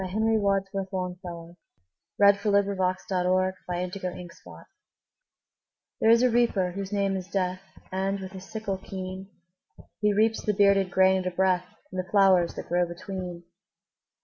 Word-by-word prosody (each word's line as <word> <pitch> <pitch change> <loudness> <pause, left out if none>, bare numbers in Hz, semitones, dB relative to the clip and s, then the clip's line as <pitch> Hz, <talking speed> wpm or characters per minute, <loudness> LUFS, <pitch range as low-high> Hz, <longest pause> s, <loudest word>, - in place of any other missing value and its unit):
Henry 220 +4 +1
Wadsworth 195 -1 -1
Longfellow 180 -2 -6 0.6
The 205 - +5
Reaper 200 0 +4
And 200 0 +2
The 185 -1 -2
Flowers - - -13 1.3
THERE 220 - +3
is 230 +2 +6
a 255 - +5
Reaper 225 -6 +2
whose 195 +1 -6
name 200 -1 0
is 185 -1 -5
Death, 185 -2 -2 0.3
And, 195 +1 -1
with 190 -1 -7
his 190 -2 -10
sickle 210 -4 -4
keen, 190 0 -7 0.7
He 210 -1 +2
reaps 220 +2 +2
the 210 - 0
bearded 200 -2 +4
grain 190 +1 +4
at 185 - -2
a - - -22
breath, 185 -1 +2 0.2
And 185 - -4
the 185 - -20
flowers 190 -4 +4
that - - -7
grow 175 0 +1
between. 175 0 -7
190 Hz, 150 wpm, -27 LUFS, 180-200 Hz, 1.3 s, is